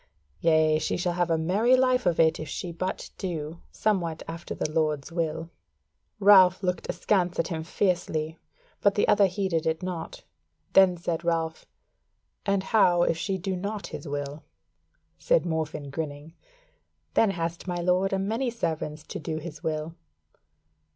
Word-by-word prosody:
Yea, 155 -1 +4
she - - -1
shall 180 -1 0
have 175 0 0
a 165 - +2
merry 205 +10 +3
life 255 -4 +2
of 170 - +1
it 160 -1 +4
if 155 - -6
she 175 - -4
but 185 +3 -4
do 165 -3 -4
somewhat 175 -7 -1
after 165 +1 -6
the - - -1
Lord's 155 -2 0
will." 165 -1 -2 0.7
Ralph 190 -2 +7
looked 180 -1 -2
askance 180 -4 +1
at 165 - 0
him 160 -2 -3
fiercely, 165 -3 -1 0.4
but 200 -1 +3
the 205 - +2
other 200 -1 +5
heeded 180 -4 -1
it 160 +2 -1
naught: 180 -3 -5 0.5
then 185 -2 +6
said 170 0 -3
Ralph, 165 -1 -1 0.8
"And 200 -1 +2
how 180 -4 +4
if 165 -2 +1
she 195 +2 -1
do 190 +1 -3
not 200 +3 -4
his - - -7
will?" 145 +1 -4 0.8
Said - - +2
Morfinn, 155 -3 -3
grinning: 150 0 -5 0.8
"Then 225 - +4
hath 170 -1 -3
my 175 -1 -2
Lord 180 +2 +2
a 195 - +1
many 225 +7 -1
servants 160 -9 -3
to - - -7
do 155 0 -4
his 155 -1 -8
will." 160 -1 -3
170 Hz, 155 wpm, -27 LUFS, 160-190 Hz, 0.8 s, Ralph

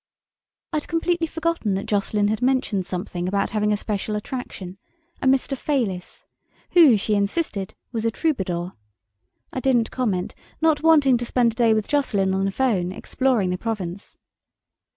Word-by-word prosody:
I'd 305 -1 -1
completely 330 0 0
forgotten 325 - -1
that 195 - -3
Jocelyn 205 0 +1
had 220 +2 -1
mentioned 250 -8 +1
something 180 -1 -4
about 200 +1 0
having 210 0 +1
a 210 - +2
special 210 0 -3
attraction: 205 -5 -6 0.4
a - - +1
"Mr. 270 +1 +2
Fayliss", 235 -11 -2 0.5
who, 310 -10 +7
she 210 +2 -1
insisted, 200 - -1 0.2
was 225 -3 -2
a 230 - +2
troubadour. 190 - -2 0.8
I - - -2
didn't 245 -3 +2
comment, 205 -8 -1 0.3
not 315 -2 +3
wanting 295 -6 +5
to 240 - -3
spend 235 -1 +2
a - - -15
day 230 -2 +4
with 215 -1 -1
Jocelyn 205 -10 +1
on 190 0 +1
the 195 - 0
phone, 195 -6 0
exploring 230 -2 0
the 180 - -2
Provence. 200 -4 -5
220 Hz, 155 wpm, -23 LUFS, 195-265 Hz, 0.8 s, who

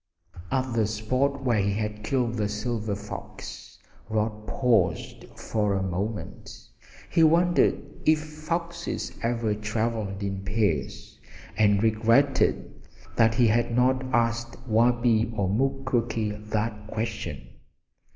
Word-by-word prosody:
At 130 -2 0
the 110 -2 +2
spot 130 +6 -1
where 120 -4 +2
he 100 0 +1
had 105 0 -3
killed 120 0 0
the 105 -3 -1
silver 105 0 -2
fox 105 +1 -9 0.3
Rod 110 0 -2
paused 110 -10 +1
for 105 -2 0
a 95 - 0
moment. 100 +4 -4 0.5
He 165 - +3
wondered 170 +2 +4 0.2
if 155 0 +4
foxes 170 +3 -4
ever 115 -2 0
traveled 110 -1 -2
in 95 -1 -3
pairs, 100 -7 -2 0.4
and 105 -1 +3
regretted 115 +5 +2 0.3
that 115 0 +4
he 120 - +4
had 115 +1 +2
not 130 +1 +3
asked 115 0 0
Wabi 115 0 +3
or 100 -2 +1
Mukoki 120 -1 0 0.2
that 105 -1 -2
question. 105 - -4
115 Hz, 115 wpm, -26 LUFS, 105-125 Hz, 0.5 s, wondered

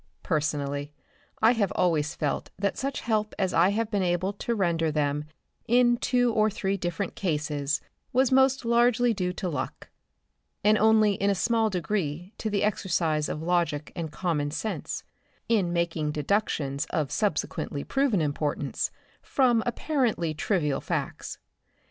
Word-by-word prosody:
Personally 145 -2 -1 0.5
I 225 - +7
have 215 -6 +1
always 155 -4 +1
felt 145 -2 -2
that 200 0 0
such 275 +1 -3
help 215 -2 -1
as 190 -1 0
I 170 +3 +5
have 220 +2 -1
been 205 -2 +1
able 180 +2 0
to 235 +3 -2
render 170 -5 +1
them 150 -1 0 0.4
in 240 0 +4
two 245 -1 +2
or 215 -1 +3
three 195 -1 -1
different 175 +1 -3
cases 150 -4 -1 0.3
was 260 +1 +3
most 265 -1 +4
largely 240 0 +3
due 180 -3 -1
to 180 - -4
luck, 160 - -4 0.7
and 210 +1 +5
only 215 -1 +4
in 200 +1 0
a 200 - +2
small 225 +3 +2
degree 180 -2 -2
to 220 - -2
the 200 -1 0
exercise 170 -7 0
of 155 - -4
logic 165 -4 0
and 165 -4 -4
common 150 -3 -1
sense 165 +9 -4 0.4
in 200 -7 +2
making 165 -3 -1
deductions 150 -4 -1
of 150 -4 -1
subsequently 160 -7 -1
proven 270 -9 +1
importance 145 -1 -1 0.3
from 245 -4 +2
apparently 240 - 0
trivial 150 -3 0
facts. - - -3
185 Hz, 145 wpm, -27 LUFS, 155-220 Hz, 0.7 s, I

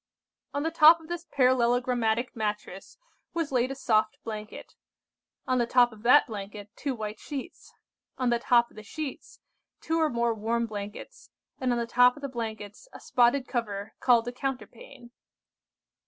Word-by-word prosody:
"On 285 - -1
the 325 - -1
top 325 +1 +7
of 320 0 -16
this 345 0 -5
parallelogramatic 245 -2 +1
mattress 210 -2 -5 0.4
was 330 -4 -1
laid 250 -1 +1
a 270 - -4
soft 220 -5 +1
blanket. 215 -1 -8 0.7
On 255 -1 +1
the 240 - +1
top 245 0 +4
of 215 -1 -14
that 250 +6 +6
blanket, 205 -2 -8
two 275 -3 -3
white 215 -1 -6
sheets. 290 +4 -8 0.5
On 255 -2 +1
the 235 - +2
top 235 0 +3
of - - -21
the 215 - -9
sheets, 310 - -7 0.4
two 325 0 -1
or 315 - +3
more 235 -2 0
warm 230 +2 -1
blankets, 210 - -8 0.3
and 255 -1 0
on 240 - +1
the 235 - -1
top 245 +1 +4
of 290 - -13
the 280 - -3
blankets, 220 - -6
a - - -11
spotted 250 +2 +2
cover 215 -4 -4
called 240 -2 +3
a - - -2
counterpane. 255 - -7
240 Hz, 170 wpm, -27 LUFS, 220-270 Hz, 0.7 s, top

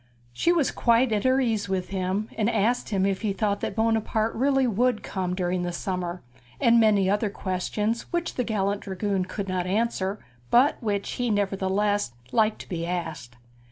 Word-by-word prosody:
She 335 - +2
was 330 -6 +2
quite 235 +1 +3
at 210 +1 0
her 260 +1 +4
ease 220 -6 0
with 185 -2 -2
him, 190 +2 -1
and 220 0 +1
asked 230 +2 +1
him 195 -3 +1
if 195 -1 0
he 210 -3 0
thought 205 0 0
that - - -3
Buonaparte 225 0 +1
would 230 - -4 0.2
really 240 0 +1
come 185 -2 -3
during 180 -1 -1
the 175 0 -2
summer, 180 0 -4 0.4
and 235 0 +5
many 210 -4 +4
other 205 +2 +1
questions 210 +4 -2
which 345 -1 -1
the 250 - -1
gallant 205 -3 -1
dragoon 195 0 -2
could 195 +2 -5
not 185 -1 -1
answer, 205 -1 0 0.3
but 260 +5 +4
which 205 -3 -1
he 245 -1 -1
nevertheless 205 - 0 0.2
liked 220 -1 +2
to - - -12
be 170 -2 -3
asked. 170 -8 -4
205 Hz, 180 wpm, -26 LUFS, 190-225 Hz, 0.4 s, and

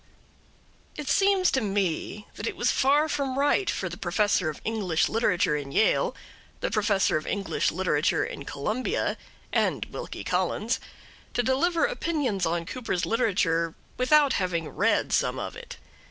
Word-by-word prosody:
It 295 -2 -5
seems 390 -2 +3
to 265 - +1
me 200 0 -2
that 210 - -5
it - - -3
was 245 - +1
far 290 +4 +3
from 275 -3 -2
right 290 +8 +2
for 185 - -1
the 175 0 -7
Professor 195 -2 +1
of 150 - -6
English 200 -8 +1
Literature 205 -9 +1
in 140 -2 -4
Yale, 220 - +2 0.4
the - - -2
Professor 205 -5 +2
of 155 - -6
English 200 -1 0
Literature 160 -4 +1
in - - -7
Columbia, 230 - -2 0.4
and - - +1
Wilkie - - -6
Collins - - 0 0.6
to 245 - +2
deliver 325 +7 +2
opinions 290 - -1
on 170 0 -1
Cooper's 230 -5 -2
literature 180 -8 +1 0.2
without 285 +2 +4
having 170 -4 -1
read - - +1
some - - +1
of - - -5
it. - - -9
210 Hz, 150 wpm, -27 LUFS, 175-270 Hz, 0.6 s, without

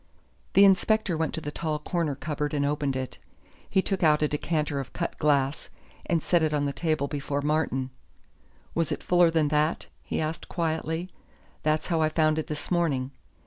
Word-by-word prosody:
The 200 - +8
inspector 200 0 +3
went 160 0 0
to 160 - -4
the 150 - -5
tall 155 0 -2
corner 155 -1 -1
cupboard 150 0 -3
and 140 -1 +1
opened 145 -2 0
it. 130 -1 -4 0.5
He 190 -1 +2
took 195 -2 -2
out 155 -2 +4
a - - +4
decanter 150 -1 -1
of 135 - -6
cut 170 - -3
glass, 140 -2 +1 0.4
and 165 -2 +1
set 175 -2 +3
it 155 -1 +1
on 145 -1 +1
the 140 - -1
table 155 -1 0
before 145 -1 -3
Martin. 145 -4 0 0.8
"Was 165 -2 0
it - - -3
fuller 175 -1 +5
than 160 -2 +2
that?" 150 +2 +1 0.2
he - - -3
asked 160 +1 -3
quietly. 160 +1 -2 0.5
"That's 155 0 +1
how 165 -2 +2
I 155 - +3
found 155 0 +2
it 155 - -3
this 150 +1 -5
morning." 145 -7 +1
155 Hz, 185 wpm, -27 LUFS, 145-165 Hz, 0.8 s, The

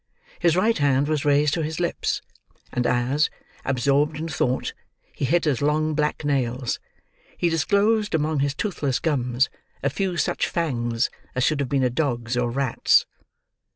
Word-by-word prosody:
His 170 -2 +3
right 215 +1 +2
hand 140 0 +3
was 150 -2 -1
raised 145 0 +3
to 165 - 0
his 155 +1 -3
lips, 175 - -1 0.5
and 125 0 +1
as, 130 +5 +2 0.3
absorbed 140 +4 +1
in 160 +2 -3
thought, 130 -5 -1 0.4
he - - -2
hit 170 +6 +2
his 145 -5 +1
long 155 +2 +1
black 150 0 -1
nails, 125 -3 0 0.6
he 175 - +2
disclosed 205 +5 +2
among 155 -1 0
his 140 0 0
toothless 145 - -1
gums 130 -4 +1 0.4
a 140 - +1
few 185 +3 -1
such - - 0
fangs 120 -7 -1 0.2
as 130 - +1
should 155 0 +2
have 140 -3 -1
been 140 -2 +1
a 125 - +2
dog's 120 -4 -1
or 120 -1 +1
rat's. 130 0 +3
145 Hz, 160 wpm, -24 LUFS, 130-160 Hz, 0.6 s, His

